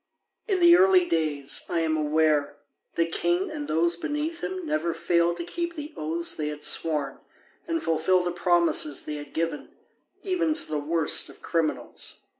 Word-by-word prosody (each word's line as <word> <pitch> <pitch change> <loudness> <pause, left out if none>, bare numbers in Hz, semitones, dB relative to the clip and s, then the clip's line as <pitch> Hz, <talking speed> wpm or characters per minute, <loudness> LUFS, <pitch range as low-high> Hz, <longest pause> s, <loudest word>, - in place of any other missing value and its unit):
In 390 -4 +1
the 345 0 +8
early 370 -1 +5
days, 150 -4 0
I 170 - 0
am 160 -1 0
aware, 150 -1 +1 0.4
the 165 - +2
king 345 - -1
and 295 -1 -5
those 170 +2 +2
beneath 300 - -4
him 375 -2 -4
never 165 - -1
failed 170 0 +1
to 170 - -3
keep 340 - -4
the 300 0 -7
oaths 165 +2 0
they 150 - -3
had 150 0 -6
sworn 150 -4 0 0.5
and 330 -1 -2
fulfil 165 +3 +2
the 175 - -2
promises 175 -4 +2
they 150 0 -5
had 145 -1 -9
given, 165 -2 -3 0.5
even 345 -5 0
to - - +3
the 155 -1 -2
worst 160 +2 +2
of - - -16
criminals. 165 -3 -2
170 Hz, 170 wpm, -26 LUFS, -, 0.5 s, the